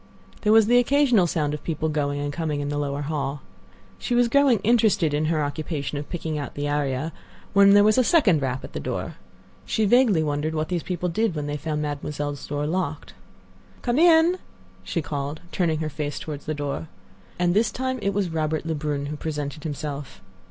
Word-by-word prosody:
There 210 Hz, -, +2 dB
was 220 Hz, -1 st, +7 dB
the 245 Hz, +3 st, +5 dB
occasional 245 Hz, -7 st, +3 dB
sound 150 Hz, -3 st, -1 dB
of 150 Hz, -, -5 dB
people 160 Hz, -1 st, -2 dB
going 145 Hz, -2 st, -1 dB
and 145 Hz, 0 st, -3 dB
coming 155 Hz, -2 st, -2 dB
in 145 Hz, 0 st, -3 dB
the 145 Hz, 0 st, -2 dB
lower 145 Hz, 0 st, -2 dB
hall. 140 Hz, -1 st, -3 dB, 0.6 s
She 245 Hz, -, -1 dB
was 240 Hz, -1 st, +4 dB
growing 280 Hz, -2 st, +4 dB
interested 210 Hz, -8 st, +3 dB
in 150 Hz, +1 st, +1 dB
her 155 Hz, -1 st, +1 dB
occupation 145 Hz, -1 st, -3 dB
of 145 Hz, -, -8 dB
picking 160 Hz, -3 st, -3 dB
out 145 Hz, -, -6 dB
the 145 Hz, 0 st, -2 dB
aria, 145 Hz, +1 st, -1 dB, 0.4 s
when 200 Hz, 0 st, +7 dB
there 205 Hz, -, +7 dB
was 215 Hz, +3 st, +4 dB
a -, -, +5 dB
second 215 Hz, -, +4 dB
rap 130 Hz, -1 st, -2 dB
at -, -, -9 dB
the -, -, -3 dB
door. -, -, -4 dB, 0.5 s
She 220 Hz, -, 0 dB
vaguely 215 Hz, -6 st, +4 dB
wondered 150 Hz, +1 st, -1 dB
what 155 Hz, 0 st, -1 dB
these 175 Hz, -2 st, -1 dB
people 180 Hz, +1 st, -3 dB
did 195 Hz, +2 st, 0 dB
when 150 Hz, -1 st, -3 dB
they 145 Hz, 0 st, -3 dB
found 150 Hz, 0 st, -3 dB
Mademoiselle's 145 Hz, -1 st, -4 dB
door 145 Hz, 0 st, -2 dB
locked. 160 Hz, -2 st, -3 dB, 0.7 s
"Come 240 Hz, +3 st, +1 dB
in," 340 Hz, +2 st, +5 dB, 0.4 s
she 165 Hz, -, -2 dB
called, 145 Hz, +1 st, -4 dB
turning 160 Hz, -4 st, 0 dB
her 155 Hz, -, -1 dB
face 145 Hz, 0 st, -4 dB
toward 150 Hz, -3 st, -5 dB
the 155 Hz, +1 st, -4 dB
door. 145 Hz, +2 st, -4 dB, 0.5 s
And 175 Hz, -1 st, +2 dB
this 215 Hz, +2 st, +2 dB
time 260 Hz, +2 st, -2 dB
it 200 Hz, -, +1 dB
was 200 Hz, -2 st, -1 dB
Robert 155 Hz, -1 st, -1 dB
Lebrun 150 Hz, -3 st, -2 dB
who 150 Hz, +2 st, -4 dB
presented 150 Hz, -1 st, -4 dB
himself. 145 Hz, -2 st, -5 dB
155 Hz, 200 wpm, -24 LUFS, 145-200 Hz, 0.7 s, was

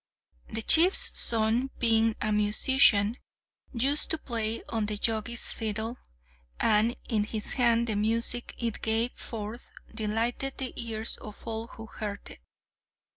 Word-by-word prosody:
The 225 Hz, 0 st, -3 dB
chief's 340 Hz, -, +5 dB
son, 230 Hz, +3 st, +3 dB
being 225 Hz, -1 st, +3 dB
a 215 Hz, -, -1 dB
musician, 210 Hz, +1 st, +3 dB, 0.5 s
used 275 Hz, +4 st, +1 dB
to 320 Hz, -, 0 dB
play 230 Hz, -5 st, -2 dB
on 220 Hz, -2 st, -3 dB
the 210 Hz, 0 st, -3 dB
Jogi's 225 Hz, +2 st, -1 dB
fiddle, 220 Hz, +2 st, -4 dB, 0.6 s
and 225 Hz, +2 st, +2 dB
in 215 Hz, -3 st, 0 dB
his 215 Hz, 0 st, -4 dB
hands 235 Hz, -2 st, +2 dB
the 220 Hz, -3 st, -1 dB
music 230 Hz, +3 st, 0 dB
it 230 Hz, -3 st, -3 dB
gave 225 Hz, +2 st, +1 dB
forth 220 Hz, +1 st, -7 dB, 0.2 s
delighted 230 Hz, +5 st, -2 dB
the 260 Hz, -2 st, -4 dB
ears 225 Hz, -1 st, 0 dB
of 210 Hz, -1 st, -12 dB
all 225 Hz, 0 st, -4 dB
who 225 Hz, -, -11 dB
heard 210 Hz, -2 st, -7 dB
it. -, -, -13 dB
225 Hz, 135 wpm, -28 LUFS, 215-235 Hz, 0.6 s, chief's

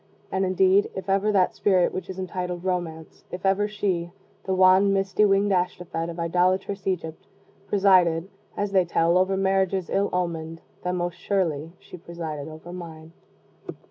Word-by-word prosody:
And, 190 Hz, 0 st, 0 dB
indeed, 190 Hz, +2 st, +3 dB
if 190 Hz, 0 st, -6 dB
ever 200 Hz, +2 st, +2 dB
that 190 Hz, -3 st, +2 dB
spirit 185 Hz, -3 st, +2 dB
which 185 Hz, -, -5 dB
is 190 Hz, -, -6 dB
entitled 180 Hz, -1 st, -4 dB
Romance 175 Hz, -4 st, -4 dB
if 180 Hz, +1 st, -7 dB
ever 195 Hz, +2 st, +2 dB
she, 190 Hz, -5 st, -2 dB, 0.4 s
the 190 Hz, -, 0 dB
wan 185 Hz, +2 st, +5 dB
misty 195 Hz, +1 st, +2 dB
winged 200 Hz, 0 st, +2 dB
Ashtophet 175 Hz, -2 st, -1 dB
of 170 Hz, 0 st, -7 dB
idolatrous 185 Hz, +3 st, 0 dB
Egypt, 160 Hz, -4 st, -3 dB, 0.4 s
presided, 185 Hz, -4 st, +3 dB, 0.3 s
as 205 Hz, -1 st, -1 dB
they 190 Hz, -2 st, +4 dB
tell, 170 Hz, 0 st, +1 dB
over 185 Hz, +1 st, +2 dB
marriages 190 Hz, -1 st, 0 dB
ill 200 Hz, +1 st, +1 dB
omened, 165 Hz, -2 st, -3 dB, 0.2 s
then 180 Hz, 0 st, -1 dB
most 175 Hz, -1 st, -3 dB
surely 165 Hz, -5 st, -1 dB
she -, -, -12 dB
presided 160 Hz, -4 st, -6 dB
over 160 Hz, +2 st, -10 dB
mine. 165 Hz, -2 st, -9 dB
185 Hz, 155 wpm, -25 LUFS, 170-195 Hz, 0.4 s, wan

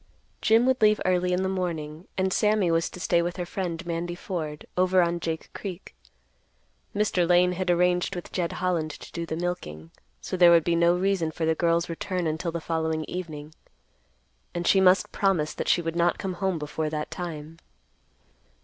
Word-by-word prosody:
Jim 225 Hz, +2 st, +4 dB
would 260 Hz, -1 st, +2 dB
leave 215 Hz, 0 st, +5 dB
early 180 Hz, -1 st, +2 dB
in 180 Hz, +1 st, +1 dB
the -, -, 0 dB
morning, 170 Hz, -4 st, -4 dB
and 190 Hz, 0 st, +1 dB
Sammy 210 Hz, -5 st, +2 dB
was 165 Hz, +1 st, +1 dB
to -, -, -10 dB
stay 170 Hz, -1 st, +2 dB
with 175 Hz, +2 st, -3 dB
her 180 Hz, -, -3 dB
friend, 175 Hz, -2 st, -4 dB
Mandy 170 Hz, +1 st, -3 dB
Ford, 160 Hz, -5 st, -5 dB
over 185 Hz, 0 st, +3 dB
on 170 Hz, 0 st, -1 dB
Jake 160 Hz, -1 st, -4 dB
Creek. 190 Hz, -2 st, -7 dB, 1.0 s
Mr. 190 Hz, -4 st, +1 dB
Lane 180 Hz, 0 st, +5 dB
had 180 Hz, 0 st, -2 dB
arranged 180 Hz, +2 st, +2 dB
with 175 Hz, -, -7 dB
Jed 175 Hz, -3 st, -2 dB
Holland 175 Hz, -4 st, -1 dB
to 150 Hz, -, -10 dB
do 170 Hz, -1 st, -5 dB
the 160 Hz, -, -3 dB
milking, 80 Hz, -, -4 dB, 0.3 s
so -, -, -4 dB
there 175 Hz, -1 st, +7 dB
would 170 Hz, -1 st, +6 dB
be 170 Hz, +1 st, +1 dB
no 170 Hz, +1 st, +4 dB
reason 185 Hz, -3 st, +1 dB
for 160 Hz, +1 st, -3 dB
the 160 Hz, -, +3 dB
girl's 170 Hz, +1 st, +1 dB
return 180 Hz, +1 st, -3 dB
until 160 Hz, +2 st, -2 dB
the 170 Hz, -, -3 dB
following 160 Hz, -1 st, -1 dB
evening, 155 Hz, -4 st, -6 dB, 1.0 s
and 175 Hz, 0 st, -2 dB
she 190 Hz, -, +5 dB
must 185 Hz, 0 st, +4 dB
promise 175 Hz, -7 st, +1 dB
that -, -, -4 dB
she 175 Hz, -, +3 dB
would 165 Hz, 0 st, -3 dB
not 170 Hz, 0 st, +2 dB
come 190 Hz, -1 st, -3 dB
home 190 Hz, -1 st, -1 dB
before 155 Hz, +1 st, -3 dB
that 150 Hz, 0 st, -4 dB
time. 165 Hz, -2 st, -6 dB
175 Hz, 190 wpm, -26 LUFS, 165-185 Hz, 1.0 s, there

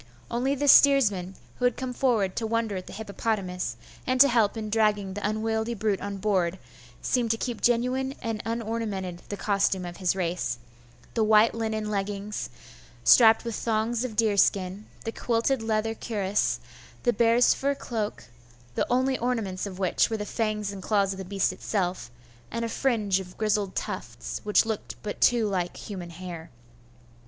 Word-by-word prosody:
Only 255 Hz, +4 st, +1 dB
the 290 Hz, +1 st, -1 dB
steersman, 210 Hz, -11 st, +5 dB, 0.2 s
who 250 Hz, -, +1 dB
had 245 Hz, -, +2 dB
come 255 Hz, -1 st, -4 dB
forward 225 Hz, -8 st, +1 dB
to 225 Hz, -, -1 dB
wonder 225 Hz, -2 st, 0 dB
at 185 Hz, -1 st, -6 dB
the -, -, -9 dB
hippopotamus, 200 Hz, -, -3 dB, 0.3 s
and 255 Hz, 0 st, +1 dB
to 280 Hz, -, +9 dB
help 230 Hz, -3 st, +2 dB
in 215 Hz, -1 st, -4 dB
dragging 210 Hz, -3 st, +2 dB
the 205 Hz, -, -6 dB
unwieldy 220 Hz, +2 st, -1 dB
brute 210 Hz, -2 st, 0 dB
on 200 Hz, 0 st, -4 dB
board, 190 Hz, -3 st, +1 dB, 0.5 s
seemed 245 Hz, -3 st, +1 dB
to 225 Hz, -, +2 dB
keep 240 Hz, -1 st, -4 dB
genuine 255 Hz, +3 st, +1 dB
and 225 Hz, -2 st, -3 dB
unornamented 220 Hz, -6 st, -3 dB
the 205 Hz, -, -4 dB
costume 195 Hz, -2 st, +1 dB
of 175 Hz, 0 st, -7 dB
his 185 Hz, -1 st, +1 dB
race, 170 Hz, -9 st, -1 dB, 0.6 s
the 225 Hz, -, +2 dB
white 215 Hz, +1 st, +5 dB
linen 220 Hz, -2 st, -2 dB
leggings, 200 Hz, +1 st, -3 dB, 0.5 s
strapped 225 Hz, -, +7 dB
with 230 Hz, -, -3 dB
thongs 225 Hz, +2 st, 0 dB
of 245 Hz, -4 st, -4 dB
deerskin, 200 Hz, -2 st, +2 dB, 0.2 s
the 225 Hz, -, -3 dB
quilted 235 Hz, +2 st, 0 dB
leather 225 Hz, 0 st, 0 dB
cuirass, 205 Hz, -3 st, -1 dB, 0.4 s
the 240 Hz, -, +3 dB
bears' 235 Hz, +2 st, +4 dB
fur 280 Hz, +1 st, -1 dB
cloak, 220 Hz, -5 st, -4 dB, 0.5 s
the -, -, 0 dB
only 260 Hz, +1 st, +2 dB
ornaments 220 Hz, -6 st, -1 dB
of 185 Hz, -2 st, -8 dB
which 190 Hz, +3 st, +2 dB
were 225 Hz, -, -1 dB
the 210 Hz, -, -4 dB
fangs 210 Hz, -2 st, -2 dB
and 195 Hz, -1 st, -8 dB
claws 200 Hz, 0 st, +1 dB
of 190 Hz, -, -9 dB
the -, -, -4 dB
beast 195 Hz, +1 st, 0 dB
itself, 180 Hz, -, -2 dB, 0.4 s
and 230 Hz, -, -2 dB
a -, -, -3 dB
fringe 215 Hz, -7 st, +1 dB
of 180 Hz, -1 st, -10 dB
grizzled 210 Hz, -3 st, 0 dB
tufts, -, -, -5 dB
which 210 Hz, +1 st, +4 dB
looked 220 Hz, -2 st, -4 dB
but 210 Hz, -, -5 dB
too 235 Hz, -3 st, +4 dB
like 180 Hz, -3 st, -2 dB
human 185 Hz, -4 st, -7 dB
hair. 170 Hz, -1 st, -8 dB
215 Hz, 170 wpm, -27 LUFS, 195-230 Hz, 0.6 s, to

